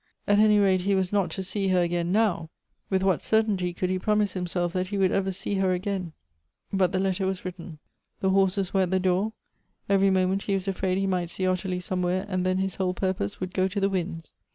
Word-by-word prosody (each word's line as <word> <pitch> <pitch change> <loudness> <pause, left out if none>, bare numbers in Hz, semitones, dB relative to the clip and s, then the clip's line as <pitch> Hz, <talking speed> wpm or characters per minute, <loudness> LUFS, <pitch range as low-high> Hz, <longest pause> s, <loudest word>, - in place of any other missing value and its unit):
At 205 0 +4
any 215 0 +5
rate 190 -2 +3
he 195 +2 +1
was 190 -1 0
not 195 -4 +2
to 190 +4 -4
see 195 +1 -1
her 185 -1 +3
again 175 0 0
now 190 -6 +1 0.2
— - - -48
with 190 -1 +1
what 190 -4 +2
certainty 210 -5 +1
could 180 +1 -2
he 185 - 0
prom 210 +2 +2
ise 205 -2 +1
himself 175 -1 -1
that 185 -1 -1
he 200 +1 -3
would 190 -2 +3
ever 195 -1 0
see 185 - -2
her 190 -1 +2
again? 185 -2 -3 0.6
But 185 -2 +2
the - - 0
letter 190 0 0
was 190 -1 -3
written 175 -3 -7 0.2
— - - -50
the 190 -2 +1
horses 195 0 +1
were 195 - +3
at 185 - +1
the 190 +1 +1
door; 185 +4 +1 0.5
every 195 0 +4
moment 190 +1 +1
he 200 - -1
was 195 0 -3
afraid 190 -1 0
he 195 - 0
might 180 -3 -1
see 185 +2 -3
Ottilie 185 0 -1
somewhere, 180 +1 -1
.and 185 -2 -1
then 185 0 +1
l)is 190 -1 -2
whole 185 -1 0
purpose 185 - -2
would 185 0 -4
go 185 0 +2
to 195 +2 -3
the 195 0 +2
winds. 170 -4 -4
185 Hz, 245 wpm, -26 LUFS, 180-195 Hz, 0.6 s, any